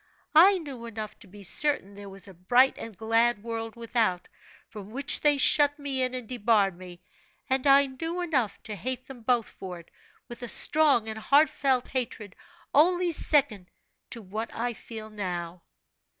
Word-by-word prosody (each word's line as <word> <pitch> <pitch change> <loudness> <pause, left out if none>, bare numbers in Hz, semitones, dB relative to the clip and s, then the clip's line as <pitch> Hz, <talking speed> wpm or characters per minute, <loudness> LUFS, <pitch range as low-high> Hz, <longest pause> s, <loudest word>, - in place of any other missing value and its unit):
I 370 +5 +7
knew 270 -8 -8
enough 215 -2 -7
to 220 - -13
be 200 +2 -14
certain 240 -2 +1
there 200 0 -10
was 195 0 -9
a 195 - -12
bright 245 +10 +3
and 220 -4 -8
glad 225 0 +1
world 225 -1 -5
without, 225 -6 -1 0.4
from 210 -3 -11
which 270 +5 +1
they 295 -1 +3
shut 290 +1 +4
me 280 -3 -3
in 255 0 -1
and 250 -3 -6
debarred 210 -5 +1
me; 180 0 -12 0.4
and 265 +1 0
I 280 +1 +6
knew 325 +6 -5
enough 270 - -1
to 215 - -6
hate 255 +6 -4
them 260 -3 -12
both 235 -1 +1
for 185 -2 -9
it, 170 - -18 0.4
with 240 0 -9
a 245 - -5
strong 285 -3 +4
and 220 0 -5
heartfelt 275 -1 +2
hatred, 230 -6 -5 0.4
only 350 +4 +3
second 270 - +1 0.4
to 230 - -6
what 215 +4 -6
I 240 +1 -2
feel 220 -1 -10
now." 175 -4 -5
235 Hz, 170 wpm, -27 LUFS, 205-275 Hz, 0.4 s, I